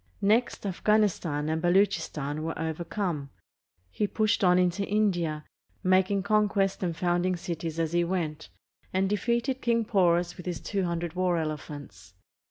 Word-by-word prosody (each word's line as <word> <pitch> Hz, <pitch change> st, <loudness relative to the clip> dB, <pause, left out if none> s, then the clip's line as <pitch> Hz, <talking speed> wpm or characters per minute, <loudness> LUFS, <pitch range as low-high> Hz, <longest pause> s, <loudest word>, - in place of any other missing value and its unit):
Next, 220 Hz, +2 st, +2 dB
Afghanistan 190 Hz, -6 st, +1 dB
and 160 Hz, +1 st, -1 dB
Baluchistan 160 Hz, -5 st, +1 dB
were 165 Hz, +1 st, -3 dB
overcome. 160 Hz, -1 st, -3 dB, 0.6 s
He 210 Hz, -, 0 dB
pushed 215 Hz, -1 st, +1 dB
on 180 Hz, -1 st, +5 dB
into 180 Hz, +2 st, +2 dB
India, 175 Hz, -7 st, 0 dB, 0.4 s
making 190 Hz, +1 st, +3 dB
conquests 200 Hz, -2 st, +1 dB
and 170 Hz, -3 st, -2 dB
founding 175 Hz, +1 st, +1 dB
cities 165 Hz, -2 st, -4 dB
as 165 Hz, 0 st, -1 dB
he 175 Hz, 0 st, +3 dB
went, 165 Hz, -3 st, -3 dB, 0.4 s
and 190 Hz, +1 st, +1 dB
defeated 235 Hz, +6 st, 0 dB
King 230 Hz, -1 st, +1 dB
Porus 175 Hz, -5 st, +2 dB
with 180 Hz, -, -9 dB
his 175 Hz, -2 st, -3 dB
two 195 Hz, -2 st, -2 dB
hundred 170 Hz, -1 st, -2 dB
war 180 Hz, -1 st, +1 dB
elephants. 145 Hz, -, -6 dB
180 Hz, 140 wpm, -28 LUFS, 160-200 Hz, 0.6 s, on